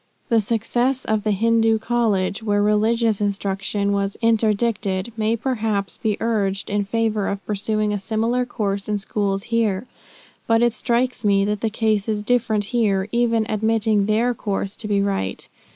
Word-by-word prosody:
"The 230 -2 +4
success 240 +4 0
of 215 -1 0
the 215 - 0
Hindoo 225 +2 +3
College, 220 -4 0
where 205 -2 +1
religious 215 +1 +2
instruction 200 0 -1
was 200 0 -1
interdicted, 220 -2 +1
may 220 0 +1
perhaps 220 -5 -2
be 215 -2 -1
urged 205 -4 -1
in 205 0 0
favor 215 -1 0
of 200 0 -4
pursuing 210 0 -1
a 205 - -1
similar 225 +5 0
course 200 -5 -3
in 210 - +1
schools 195 0 -2
here. 220 -2 +1 0.6
But 225 +1 +3
it 240 -2 +3
strikes 245 +2 0
me, 200 -1 +3
that 210 0 -2
the 225 - +1
case 215 -1 0
is 210 -1 -1
different 225 -2 +1
here, 205 -4 +1
even 230 -2 +2
admitting 220 -1 +1
their 230 +3 +2
course 200 -3 -3
to 220 - -4
be 200 -1 +1
right. 195 - -2
215 Hz, 160 wpm, -22 LUFS, 200-230 Hz, 0.6 s, The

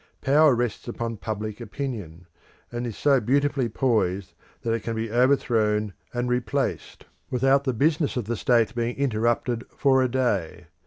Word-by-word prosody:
Power 145 0 +5
rests 120 -1 -2
upon 115 -1 -4
public 110 +1 -5
opinion, 105 - -6 0.5
and 120 0 -3
is 115 - -6
so 140 -2 +4
beautifully 140 +1 +1
poised 100 -6 0 0.3
that 115 - -1
it 115 - -1
can 115 +2 -3
be 110 0 -3
overthrown 110 -5 +2 0.2
and 120 0 -2
replaced 125 -2 -2 0.2
without 135 +2 +2
the 130 - +1
business 150 +3 +1
of 120 - -2
the 120 +3 -2
state 115 0 +2
being 120 0 -2
interrupted 120 -2 0
for 135 -2 +2
a 130 - +1
day. 100 -9 -1
120 Hz, 155 wpm, -25 LUFS, 110-130 Hz, 0.5 s, Power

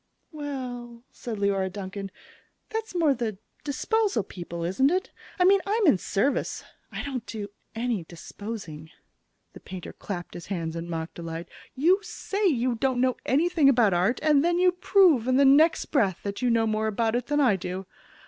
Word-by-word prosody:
"Well," 250 -6 -6
said 230 -3 -6
Leora 195 -2 0
Duncan, 195 0 -6 0.6
"that's 445 -3 -4
more 320 -5 +3
the 230 -6 -3 0.3
disposal 385 - 0
people, 170 -2 -7
isn't 190 +11 +2
it? 375 +7 -1 0.3
I 360 - +3
mean, 390 +1 +6
I'm 425 +1 +2
in 250 - +5
service. 235 +12 -1 0.3
I - - -5
don't 260 -4 -5
do 210 -2 -5 0.3
any 230 -5 -1
disposing." 170 -2 -8 0.6
The - - -11
painter 185 -1 -8
clapped 175 -4 -6
his 175 - -9
hands 165 -4 -3
in 170 +1 -5
mock 165 -1 -4
delight. 165 0 -6 0.3
"You 340 +9 +4
say 405 0 -2
you 255 -6 +1
don't 250 +2 0
know 255 0 +2
anything 315 +1 +4
about 235 -7 +4
art, 185 +8 +2
and 300 -2 +4
then 345 +1 +2
you 365 0 +4
prove 360 - +4
in 255 0 +3
the 280 - +5
next 310 +4 +5
breath 200 - +1
that 200 +3 -4
you 250 - +2
know 230 -1 +3
more 220 0 0
about 220 +1 0
it 245 0 -2
than 295 0 +1
I 250 -8 +4
do! 185 +1 -5
240 Hz, 175 wpm, -26 LUFS, 195-295 Hz, 0.6 s, mean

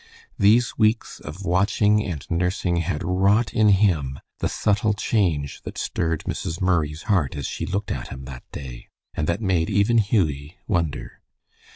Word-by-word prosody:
These 115 +5 +4
weeks 110 +1 +1
of 85 +7 -8
watching 105 +3 +3
and 80 -7 -5
nursing 90 +1 0
had 85 -2 -2
wrought 95 +6 +2
in 110 -1 +4
him 85 -10 +2 0.2
the - - 0
subtle 105 0 +1
change 85 - 0
that - - -8
stirred 80 -1 -1
Mrs. 80 +3 -4
Murray's 80 -4 0
heart 95 - +1
as 70 -2 -4
she - - -4
looked 100 +2 -2
at - - -4
him 65 0 -8
that 65 -2 -10
day, 65 -4 -8 0.3
and 75 - -2
that 85 +6 0
made 95 -4 +1
even 105 +3 +3
Hughie 85 - 0
wonder. 85 -4 -2
90 Hz, 160 wpm, -23 LUFS, 75-105 Hz, 0.3 s, These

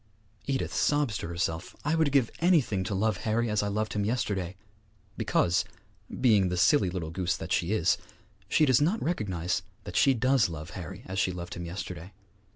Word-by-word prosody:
Edith 135 -1 -1
sobs 145 -7 +1
to - - -4
herself, 85 0 -3
'I 150 - +1
would 160 -3 +2
give 130 -5 +3
anything 155 - +3
to 100 - -2
love 105 0 +1
Harry 115 +2 0
as 105 - +2
I 105 - -1
loved 105 +1 -1
him 105 - 0
yesterday!' 100 -5 -1 0.6
because, 90 +1 +2 0.6
being 105 -7 +4
the 90 - -2
silly 95 - +4
little 85 -3 -4
goose 85 -1 -1
that 80 - -7
she 85 +3 +1
is, 90 -6 +2 0.5
she 155 - +4
does 130 -1 +4
not 180 +10 +2
recognize 95 - -1 0.2
that - - -8
she 135 -1 +5
does 125 -2 +3
love 80 0 -7
Harry 95 +3 -8
as 95 +1 -3
she 95 - +2
loved 90 0 -6
him 85 - -6
yesterday. 90 +1 -7
100 Hz, 185 wpm, -28 LUFS, 90-125 Hz, 0.6 s, she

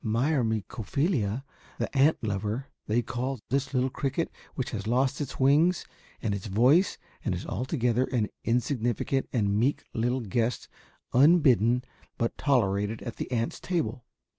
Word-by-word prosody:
"Myrmecophila, 115 - 0 0.3
the - - -3
ant 140 +2 +4
lover, 105 +4 -2 0.2
they 115 +3 +2
call 130 +3 -3
this 140 0 0
little 130 -1 +1
cricket 145 +5 -2 0.2
which 130 - -3
has 105 -2 -4
lost 130 +4 +1
its 140 - -5
wings 150 +7 +4 0.4
and 110 -4 0
its 100 +1 -4
voice 130 - +4 0.3
and - - 0
is - - -6
altogether 125 -1 0
an 115 -5 -1
insignificant 120 +2 0
and 100 -5 +1
meek 130 +6 +1
little 125 +3 0
guest 115 +3 -1 0.5
unbidden 125 - +5 0.3
but 115 - -1
tolerated 105 -6 +1
at 120 - -6
the - - -5
ant's 115 -1 -1
table. 165 -8 -2
125 Hz, 140 wpm, -28 LUFS, 110-135 Hz, 0.5 s, unbidden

